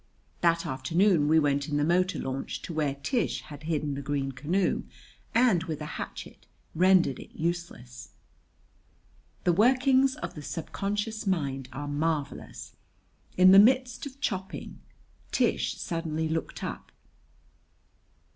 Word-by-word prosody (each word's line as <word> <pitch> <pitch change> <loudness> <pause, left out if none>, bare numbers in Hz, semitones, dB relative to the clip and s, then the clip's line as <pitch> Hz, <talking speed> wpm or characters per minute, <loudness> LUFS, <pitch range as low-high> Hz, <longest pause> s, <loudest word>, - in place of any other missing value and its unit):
That 170 -1 +2
afternoon 160 +5 +2
we 160 +1 +4
went 140 -1 +1
in 145 - 0
the 145 - +2
motor 180 +4 +2
launch 135 +1 -4
to 170 - -6
where 150 -3 0
Tish 235 - -1
had 145 -2 -11
hidden 155 -2 -2
the 140 - -4
green 140 -1 -2
canoe 160 +9 0 0.5
and, 230 -8 +4
with 160 -4 -4
a 150 - -5 0.2
hatchet, - - -9 0.3
rendered 180 -5 +4
it - - -11
useless. 155 -8 -4 1.3
The 175 - +3
workings 260 +6 +4
of 305 - -6
the 150 - -8
subconscious 205 +7 -3
mind 135 -8 -1
are 145 +3 -6
marvelous. 150 0 -3 0.6
In 185 +1 +8
the 195 - +9
midst 255 +5 +3
of 275 0 -12
chopping, 190 -7 -4 0.5
Tish - - +1
suddenly 160 -2 -2
looked 160 +1 -3
up. - - -6
165 Hz, 130 wpm, -28 LUFS, 145-195 Hz, 1.3 s, the